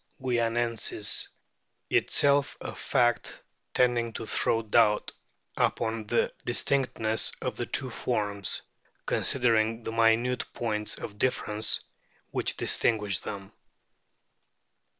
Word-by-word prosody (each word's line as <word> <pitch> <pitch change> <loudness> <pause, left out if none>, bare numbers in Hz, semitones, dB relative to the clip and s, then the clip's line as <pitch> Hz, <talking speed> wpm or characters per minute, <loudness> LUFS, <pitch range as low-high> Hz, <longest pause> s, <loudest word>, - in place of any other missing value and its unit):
guianensis, 120 -4 +1 0.6
itself 140 0 +2
a - - -6
fact 120 -1 +1 0.3
tending 120 -2 +2
to 115 - -6
throw 115 +1 +1
doubt 105 -1 +3 0.4
upon 110 -1 0
the 120 - +1
distinctness 120 -3 +1
of - - -3
the - - -3
two - - -2
forms, 100 -2 -1 0.4
considering 115 -3 +1
the 115 - -3
minute 115 +2 +3
points 105 -3 -1
of 105 -1 -8
difference 110 -4 0 0.5
which - - -1
distinguish 105 -5 0
them. 100 -2 -7
115 Hz, 95 wpm, -28 LUFS, 105-120 Hz, 0.6 s, doubt